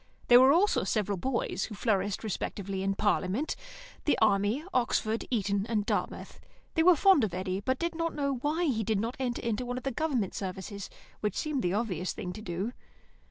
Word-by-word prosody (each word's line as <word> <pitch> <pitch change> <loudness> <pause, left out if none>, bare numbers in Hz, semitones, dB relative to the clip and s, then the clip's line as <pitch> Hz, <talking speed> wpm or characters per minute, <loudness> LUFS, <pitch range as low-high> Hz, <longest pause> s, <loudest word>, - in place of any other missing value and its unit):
There 245 0 +10
were 260 +1 +7
also 375 +7 +3
several 205 -3 0
boys, 235 -5 -1
who 215 - -8
flourished 200 -2 0
respectively 195 -2 -3
in 195 0 0
Parliament, 205 +6 0 0.5
the 295 - +3
Army, 205 +6 +2
Oxford, 230 -2 +1
Eton, 200 -3 0
and 210 -3 0
Dartmouth. - - -3 0.3
They 320 - +2
were 360 +1 +7
fond 380 - +5
of 190 -5 -1
Eddy, 185 +1 -2
but 260 +6 0
did 340 +3 -2
not 330 0 -2
know 280 -2 0
why 300 +7 0
he 230 -8 +1
did 215 -1 0
not 230 +4 -2
enter 240 -2 -1
one 245 0 -3
of 255 - -6
the 270 - -1
Government 255 - -1
services, 190 +1 -5 0.3
which 210 - -1
seems 300 -4 -1
the 175 -3 0
obvious 190 -5 -1
thing 180 -5 -5
to 215 - -8
do. 190 +5 -3
220 Hz, 190 wpm, -30 LUFS, 195-265 Hz, 0.5 s, There